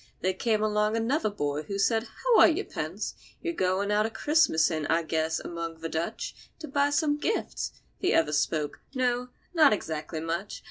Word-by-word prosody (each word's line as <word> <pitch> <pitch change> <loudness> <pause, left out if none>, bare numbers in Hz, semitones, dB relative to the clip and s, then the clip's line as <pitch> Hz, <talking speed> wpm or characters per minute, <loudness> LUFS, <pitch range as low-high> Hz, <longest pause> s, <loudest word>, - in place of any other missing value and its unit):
There 185 +1 +1
came 215 +2 0
along 210 +1 +1
another 230 +1 +1
boy, 145 -7 -2
who 200 +5 -5
said, 225 +3 +2 0.2
"How - - +5
are - - +9
you, 340 +5 +1
Pence? - - -4 0.3
You're 340 -1 -1
goin' 190 - 0
out 210 +1 +3
a - - -5
Christmassin', 175 - +2
I 165 +1 +2
guess, 160 0 0
among 165 -1 -6
the 165 - -3
Dutch, 170 +8 -4
to 315 - -8
buy 285 0 +2
some 295 0 +1
gifts." 430 +9 -2 0.3
The 375 - +2
other 150 -2 +3
spoke: 150 0 0 0.2
"No—not 250 +4 +2
exactly 160 -4 -4
much. 170 +5 -3
210 Hz, 175 wpm, -28 LUFS, -, 0.3 s, are